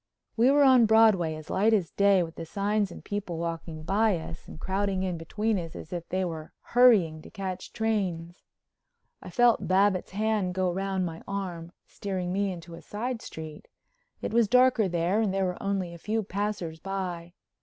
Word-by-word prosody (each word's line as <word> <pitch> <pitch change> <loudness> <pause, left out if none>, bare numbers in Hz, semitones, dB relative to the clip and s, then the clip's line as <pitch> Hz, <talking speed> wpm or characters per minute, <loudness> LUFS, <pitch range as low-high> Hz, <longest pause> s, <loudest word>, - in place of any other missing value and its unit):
We 235 +3 +4
were 285 +1 +5
on 255 -4 +6
Broadway 215 -8 +4
as 155 0 -9
light 215 +4 +3
as 190 -6 +1
day 200 -2 +4
with 165 -1 -7
the 165 - -7
signs 205 +1 0
and - - -11
people 205 -5 -4
walking 165 -1 -5
by 200 +3 +2
us 165 0 -8
and - - -10
crowding 190 +1 -1
in 185 -2 -1
between 205 +6 -1
us 165 -2 -7
as 160 - -8
if 170 -1 -5
they 185 0 0
were 160 -3 -6 0.2
hurrying 210 -11 +5
to - - -13
catch 190 -3 -6
trains. 185 -6 -2 0.8
I - - -9
felt 240 -2 +3
Babbitts' 190 0 +2
hand 210 -3 0
go 185 -1 +1
round 190 0 -1
my 165 -1 -6
arm, 180 -4 -4
steering 185 -3 -4
me 200 0 0
into 170 -1 -9
a 165 - -9
side 235 +3 -4
street. 155 -1 -9 0.6
It - - -3
was 235 -2 +4
darker 250 -2 +4
there 175 +4 +1
and 210 -3 +1
there 195 0 0
were 180 -1 -3
only 195 -3 -2
a 170 - -10
few 220 +4 -1
passers 195 -5 -3
by. 180 -3 -5
190 Hz, 185 wpm, -28 LUFS, 170-210 Hz, 0.8 s, on